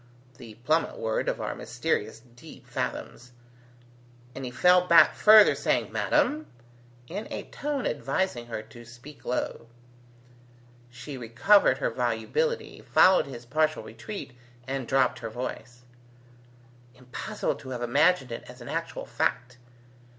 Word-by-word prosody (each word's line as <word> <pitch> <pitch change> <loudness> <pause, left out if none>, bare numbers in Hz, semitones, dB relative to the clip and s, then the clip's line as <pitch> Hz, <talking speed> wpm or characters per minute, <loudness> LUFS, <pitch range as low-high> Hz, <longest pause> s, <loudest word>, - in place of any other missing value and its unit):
the 115 -3 -11
plummet 160 +2 +1
word 110 -1 -1
of - - -3
our - - -3
mysterious 110 +2 -3
deep 120 - -14
fathoms; 125 +1 -5 1.0
and 135 - -7
he 125 - -4
fell 180 +7 +4
back 170 - +7
further 215 -1 +7
saying, - - -1
"Madam?" 305 +1 +1 0.6
in 200 - -6
a - - -4
tone 285 -2 -3
advising 135 -2 -2
her 115 -2 -5
to 115 +2 -14
speak 120 +5 -14
low. 125 -1 -3 1.2
She 125 +3 -9
recovered 120 - +4
her - - -1
volubility, 470 0 -2
followed 185 -5 +4
his 120 -3 -9
partial 155 +4 0
retreat, 205 - -8 0.3
and 135 -2 -3
dropped 130 -2 +2
her 115 - -5
voice, 120 +1 -7 1.1
"Impossible 125 -1 -4
to 130 - -11
have 125 -2 -4
imagined 140 +2 +2
it 115 - -5
as - - -12
an - - -10
actual - - -4
fact! 125 +1 -2
130 Hz, 130 wpm, -27 LUFS, 120-180 Hz, 1.2 s, back